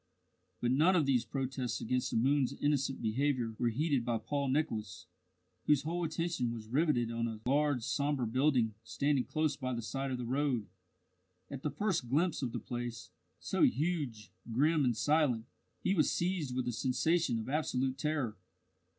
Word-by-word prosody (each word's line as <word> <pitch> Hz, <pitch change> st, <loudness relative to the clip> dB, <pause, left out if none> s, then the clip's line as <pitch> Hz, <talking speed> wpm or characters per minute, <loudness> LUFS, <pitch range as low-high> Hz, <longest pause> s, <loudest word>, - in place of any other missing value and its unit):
But 120 Hz, -, +1 dB
none 160 Hz, +8 st, +4 dB
of 160 Hz, -5 st, +3 dB
these 130 Hz, -4 st, +2 dB
protests 130 Hz, -3 st, -2 dB
against 125 Hz, +2 st, -1 dB
the -, -, -1 dB
moon's 135 Hz, +2 st, +2 dB
innocent 140 Hz, -3 st, 0 dB
behaviour 120 Hz, 0 st, 0 dB
were 120 Hz, -, +2 dB
heeded 140 Hz, +1 st, +1 dB
by 115 Hz, -1 st, 0 dB
Paul 140 Hz, +6 st, -2 dB
Nicholas, 115 Hz, -9 st, -1 dB, 0.6 s
whose 150 Hz, -2 st, +4 dB
whole 170 Hz, +3 st, -2 dB
attention 160 Hz, -6 st, -1 dB
was 110 Hz, -2 st, -7 dB
riveted 125 Hz, -4 st, +2 dB
on 115 Hz, 0 st, -1 dB
a 110 Hz, -2 st, -5 dB
large 140 Hz, -1 st, +2 dB
sombre 140 Hz, 0 st, 0 dB
building 125 Hz, -1 st, +2 dB
standing 140 Hz, +3 st, 0 dB
close 155 Hz, -2 st, 0 dB
by 130 Hz, -3 st, -3 dB
the 120 Hz, -, -3 dB
side 135 Hz, +4 st, -3 dB
of 130 Hz, -, -2 dB
the 125 Hz, -, -4 dB
road. 130 Hz, -3 st, 0 dB, 0.9 s
At 135 Hz, -2 st, -5 dB
the 150 Hz, -, -1 dB
first 155 Hz, -, -1 dB
glimpse 160 Hz, +5 st, +1 dB
of 125 Hz, -4 st, -2 dB
the -, -, -3 dB
place, 120 Hz, -1 st, -5 dB, 0.3 s
so -, -, -2 dB
huge, 135 Hz, -, +1 dB, 0.2 s
grim, 150 Hz, +6 st, +3 dB
and 120 Hz, -3 st, +1 dB
silent, 145 Hz, -7 st, +2 dB, 0.4 s
he 190 Hz, -, +2 dB
was 155 Hz, -6 st, +3 dB
seized 170 Hz, -7 st, -1 dB
with 130 Hz, -1 st, -1 dB
a -, -, +1 dB
sensation 130 Hz, +4 st, +1 dB
of 110 Hz, -, -4 dB
absolute 135 Hz, -2 st, -1 dB
terror. 135 Hz, -8 st, -1 dB
135 Hz, 170 wpm, -33 LUFS, 120-150 Hz, 0.9 s, none